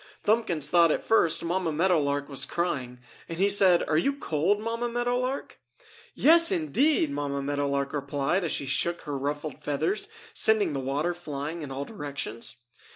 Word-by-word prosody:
Thumbkins 205 -9 +1
thought 170 +1 +5
at - - -1
first 195 -8 +2
Mamma 175 0 -1
Meadow 175 +2 +2
Lark 140 0 -1
was 140 -2 -4
crying, 130 -8 -3 0.3
and 165 - -5
he 195 +3 +3
said: 195 -3 +5
"Are 155 - +2
you 275 +11 +1
cold, 185 - 0
Mamma 230 +2 -3
Meadow 240 +1 0
Lark?" 255 +2 -4 0.6
"Yes, 335 +2 +6
indeed!" 165 - +1
Mamma 140 -1 -3
Meadow 145 0 -1
Lark 140 0 -1
replied 145 +5 -1
as 165 - -1
she 140 - -2
shook 170 +5 -1
her 145 - -5
ruffled 145 +3 -4
feathers, 390 - -1 0.3
sending 220 -7 +3
the 140 - -2
water 140 +6 -1
flying 155 -1 -6
in 145 - -6
all 135 +1 -4
directions. 140 - -6
160 Hz, 170 wpm, -27 LUFS, 140-205 Hz, 0.6 s, Yes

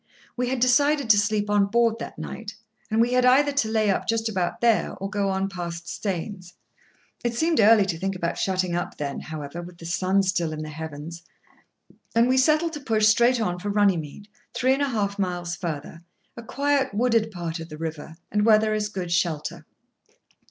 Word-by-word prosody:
We 250 0 -1
had 260 -1 -1
decided 280 +1 +3
to 205 - +5
sleep 205 0 0
on 205 -1 +3
board 230 +1 +2
that - - -7
night, 205 -3 -7 0.3
and 220 0 0
we 240 +2 +3
had 250 0 +3
either 270 +3 +5
to 280 -6 0
lay 215 -2 +2
up - - -2
just 225 0 0
about 185 -5 -2
there, 230 -2 +2
or 195 - -5
go 200 -1 -1
on 190 0 0
past 170 -3 -6
Staines. 180 -1 -5 0.7
It 240 -1 -1
seemed 320 +3 +1
early 215 -1 +6
to 170 -4 -3
think 195 +1 -2
about 170 -2 -3
shutting 185 -2 0
up 175 - -4
then, 140 -1 -4
however, 155 +1 -7
with 175 0 -11
the 165 - -11
sun 185 +3 +1
still 175 -4 0
in 155 0 -5
the 155 - -7
heavens, 160 +2 -7 0.9
and 230 +1 +5
we 260 +1 +2
settled 310 +4 +2
to 300 - -5
push 220 -6 +1
straight 235 +3 +4
on 180 -5 -1
for 205 - -4
Runnymead, 200 -3 0 0.3
three 260 +1 +3
and 275 - -1
a 285 - +1
half 200 -4 -2
miles 175 -2 -2
further, 165 -1 -6 0.3
a 235 - -8
quiet 275 0 0
wooded 230 -1 +2
part 175 -4 -5
of 165 0 -8
the 155 - -8
river, 160 0 -6
and 210 0 +1
where 215 -1 +6
there 215 0 0
is 210 -1 -1
good 185 -4 -5
shelter. 170 -4 -1
205 Hz, 200 wpm, -24 LUFS, 175-230 Hz, 0.9 s, early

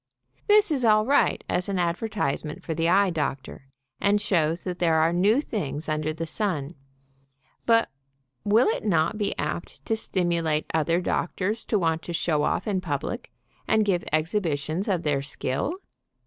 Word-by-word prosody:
This 420 -3 +5
is 270 -4 0
all 215 -1 +4
right 280 +4 +2
as 180 +2 -1
an 195 - -1
ad 170 -1 +1
vertisement 175 -8 -3
for 165 - -3
the 165 +1 +1
eye 195 +1 +4
doctor, 135 -4 -4 0.3
and 205 +1 +3
shows 170 -5 +1
that 180 -1 -4
there 165 -2 +3
are 160 +1 +3
new 200 +8 +3
things 160 - -4
under 155 0 -1
the 165 +1 -4
sun, 165 -5 -2 0.9
but 230 -1 +4 0.6
will 215 +4 +4
it 220 - 0
not 190 +1 +1
be 205 -1 -1
apt 175 - -5
to 225 - +1
stimulate 170 -7 -1
other 165 +2 +1
doctors 190 +5 -1
to 215 - +1
want 165 -3 0
to 175 - -6
show 160 -2 +1
off 170 - 0
in 195 -3 0
public, 165 - -4 0.4
and 220 -1 +3
give 180 -4 +1
exhibitions 160 +1 -1
of 180 -4 0
their 145 -2 +1
skill? 140 - -2
175 Hz, 165 wpm, -25 LUFS, 155-210 Hz, 0.9 s, This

